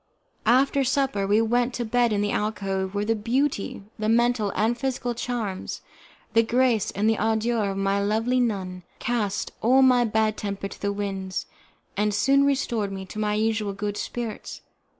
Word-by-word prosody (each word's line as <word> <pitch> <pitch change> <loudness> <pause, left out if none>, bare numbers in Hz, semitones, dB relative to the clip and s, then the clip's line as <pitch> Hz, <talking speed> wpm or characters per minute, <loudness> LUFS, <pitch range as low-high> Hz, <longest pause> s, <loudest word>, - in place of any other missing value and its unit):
After 270 +3 +4
supper 260 -7 0
we 210 +2 +4
went 245 +2 +1
to 240 - -2
bed 240 +1 +2
in 205 -1 +1
the 205 0 0
alcove, 195 -2 -2
where 205 +1 0
the 225 - +2
beauty, 230 -1 -1 0.2
the 215 0 0
mental 235 -2 +2
and 220 +4 +2
physical 250 -2 -2
charms, 230 -5 -4 0.5
the 230 - +6
grace 235 -2 +2
and 205 +2 0
the 220 -1 +2
ardour 220 0 +1
of 195 - -3
my 195 0 +1
lovely 225 +5 +1
nun, 190 -6 -1 0.2
cast 215 -5 -1
all 260 +4 +5
my 250 -2 +5
bad 220 -1 +1
temper 200 -1 -4
to - - -12
the 200 - 0
winds, 195 -2 -3 0.5
and 210 +1 +1
soon 275 +7 +4
restored 240 -7 0
me 190 -1 -6
to 210 - -8
my 210 -1 0
usual 215 -1 0
good 205 +1 -3
spirits. 230 0 -5
220 Hz, 170 wpm, -25 LUFS, 200-240 Hz, 0.5 s, the